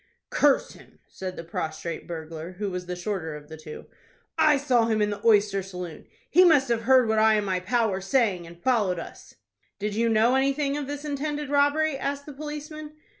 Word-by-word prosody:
"Curse 285 -2 +3
him!" - - -17
said 185 -1 -7
the 165 - -7
prostrate 160 0 -5
burglar, 165 +1 -7
who 200 +1 -4
was 180 -1 -5
the 180 - -3
shorter 175 -4 -4
of 150 0 -11
the 160 - -8
two."I 155 - -2
saw 250 -5 +2
him 220 -1 +1
in 210 0 +1
the 205 - -6
oyster 205 -3 +4
saloon. 180 -3 -8 0.2
He 360 +4 +7
must 290 -7 +5
have 230 -1 0
heard 260 -3 +6
what 220 0 +2
I 220 0 +5
and 210 -1 0
my 185 -2 0
pal 225 +4 +1
were 190 0 -3
saying, 195 -4 +1
and 170 0 -13
followed 215 -8 +2
us." 165 - -10 0.4
"Did 210 0 -3
you 230 +2 +1
know 225 +2 +4
anything 275 +1 +1
of 290 -2 -4
this 290 +1 -5
intended 295 0 -3
robbery?" 290 0 +2
asked 280 +1 -3
the 295 - -9
policeman. 300 +1 -7
220 Hz, 200 wpm, -26 LUFS, 180-280 Hz, 0.4 s, He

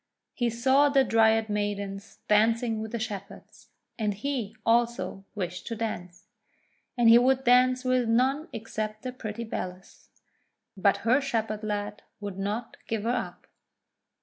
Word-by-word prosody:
He 240 -2 0
saw 265 +5 +3
the 275 -1 +4
Dryad 225 -2 +3
Maidens 205 -1 -4
dancing 225 +1 +2
with 220 0 -6
the 235 - -2
Shepherds, 210 -4 -7 0.3
and 210 -2 0
he, 230 -2 -3
also, 230 -5 +1
wished 180 -2 -4
to 230 - -3
dance. 180 -6 -5 0.7
And 240 -1 +4
he 230 +1 +9
would 260 +1 +2
dance 255 +1 +4
with 255 -2 +2
none 265 +6 +2
except 215 -2 -5
the 255 - -3
pretty 230 -2 -6
Bellis. 185 -4 -7 0.7
But 200 +1 +3
her 255 +5 +4
Shepherd 220 -5 -2
lad 205 -1 -3 0.2
would 200 -2 -6
not 210 +4 -3
give 220 -2 -2
her 230 - +1
up. 245 - -4
225 Hz, 145 wpm, -27 LUFS, 205-245 Hz, 0.7 s, he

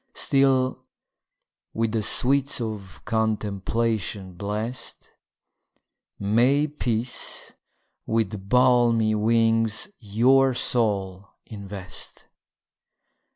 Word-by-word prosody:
Still, 130 -2 +1 0.9
with 115 0 0
the 110 -1 -1
sweets 135 +6 +3
of 105 -5 -6
contemplation 110 -2 -2
bless'd, 105 +7 -5 1.1
May 120 +8 +2
peace 120 -5 -2 0.5
with 105 -3 -2
balmy 120 -3 +3
wings 115 - +1
your 125 +4 +3
soul 100 -6 -1 0.2
invest! 100 -3 -8
115 Hz, 65 wpm, -24 LUFS, 105-125 Hz, 1.1 s, sweets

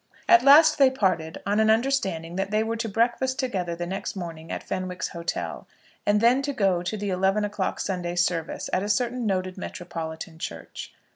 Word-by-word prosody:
At 350 - +7
last 310 +3 +7
they 270 -2 +7
parted 185 -10 -1
on 205 +2 +1
an 220 0 +4
understanding 220 -9 +1
that 195 +1 -1
they 215 +1 +1
were 225 +1 -2
to 225 0 -3
breakfast 240 +5 +1
together 185 -10 -2
the 175 +1 -4
next 190 +3 -4
morning 165 -3 -7
at - - -4
Fenwick's 185 -1 -3
hotel, 170 -2 -4 0.4
and 205 0 +4
then 240 +4 +4
go 200 -11 +1
to 185 +5 -3
the 205 -1 -3
eleven 195 +3 +1
o'clock 205 -2 -2
Sunday 175 -2 -3
service 175 -2 -1
at 185 - +2
a 205 - -3
certain 240 +2 0
noted 185 -1 -2
metropolitan 160 -2 -6
church. 85 - -7
195 Hz, 185 wpm, -25 LUFS, 175-230 Hz, 0.4 s, At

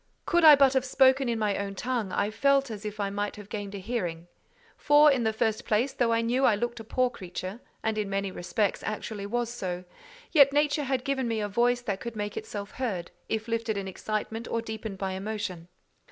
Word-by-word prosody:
Could 345 -1 +2
I 305 -2 +11
but 275 -1 +5
have 265 -1 +2
spoken 265 0 +4
in 230 - 0
my 210 -2 0
own 200 -1 -4
tongue, 235 -2 -2
I 205 +3 0
felt 275 +2 +2
as 215 -1 -7
if 210 0 -5
I 200 -1 -1
might 205 +1 -2
have 205 -1 -11
gained 205 -1 -5
a - - -4
hearing; 180 -5 -3 0.5
for, 295 0 +6
in 265 -3 +1
the 220 -1 +2
first 220 0 0
place, 230 +6 +1
though 235 -2 +1
I 230 0 +2
knew 245 +3 +1
I 235 -5 +5
looked 240 +2 -3
a - - -7
poor 250 +3 +1
creature, 185 +2 -6 0.2
and 220 -1 0
in 205 -2 -2
many 195 0 -1
respects 180 +3 -1
actually 215 -1 -4
was 240 +2 -1
so, 180 -6 -4 0.5
yet 280 -3 +6
nature 295 0 +2
had 260 -1 -1
given 265 -2 0
me 225 -1 -1
a 210 - -1
voice 240 +4 +2
that 200 -5 -3
could 235 -1 -6
make 205 -1 -4
itself 200 -1 -6
heard, 195 -10 -3 0.2
if 220 0 -2
lifted 230 -2 -1
in 195 -1 -3
excitement 215 +4 -4
or 230 - -1
deepened 220 -3 -6
by 190 0 -2
emotion. 190 -3 -4
220 Hz, 220 wpm, -28 LUFS, 200-245 Hz, 0.5 s, I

